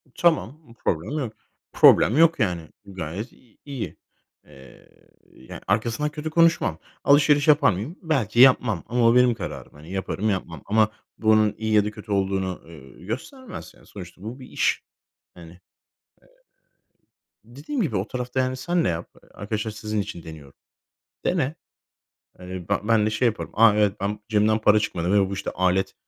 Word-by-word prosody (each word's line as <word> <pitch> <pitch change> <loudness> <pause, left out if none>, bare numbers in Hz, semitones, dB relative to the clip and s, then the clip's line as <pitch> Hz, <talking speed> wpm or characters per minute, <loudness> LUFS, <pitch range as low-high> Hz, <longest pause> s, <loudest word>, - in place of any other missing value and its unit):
Tamam, 160 -4 +1
bir 115 - -16
problem 115 - -2
yok, 120 -6 -4 0.4
problem 120 - +6
yok, 165 -1 +5
yani, 90 -7 -1 0.2
gayet 95 - -6
i 120 -4 -25
iyi, 140 -5 -6 0.5
eee, 65 -1 -17 0.4
ya, 65 - -11
arkasından 115 +7 0
kötü 150 +1 -5
konuşmam. 165 - +2 0.2
Alışveriş 145 +1 +4
yapar 145 -5 +5
mıyım? 110 - -5
Belki 130 - -1
yapmam. 125 -7 +5
Ama 120 -1 +2
o 115 - +4
benim 125 -1 +5
kararım, 100 -6 -7
hani, 75 +4 -13
yaparım, 95 +2 -2
yapmam. 85 -6 -3
Ama 110 +1 +2 0.3
bu, 110 - 0
onun 110 -1 +4
iyi 110 0 -2
ya 105 -1 +4
da 105 - -3
kötü 105 0 -11
olduğunu, 95 -2 -1
ııı, 70 -6 -14
göstermez. 130 - -7
Yani, - - -21
sonuçta 90 -3 -11
bu 115 +5 -7
bir 130 - -11
iş, - - 0 0.5
hani. 85 -2 -13
Eee, 90 - -17 1.8
dediğim 140 - -5
gibi 155 - -1
o 95 +3 -2
tarafta, 125 +1 -4
yani, 130 0 0
sen 170 +6 0
de - - +2
yap, 85 0 -4
eee, - - -23
arkadaşlar 110 +2 -4
sizin 105 0 -3
için 100 -4 -8
deniyorum. 75 -4 -11 0.7
Dene. 160 -4 0 0.8
Hani, 90 -1 -8
be 100 - +2
ben 110 -1 +3
de - - +1
şey 110 +4 0
yaparım. 110 - -3
"A, 110 -1 +5
evet, 105 -2 +2
ben 105 +1 -2
cebimden 110 0 +2
para 105 0 +5
çıkmadı 90 -4 -2
ve 100 -2 +3
bu, - - -4
işte, 100 - -4
alet 95 +1 0
110 Hz, 170 wpm, -24 LUFS, 95-130 Hz, 1.8 s, problem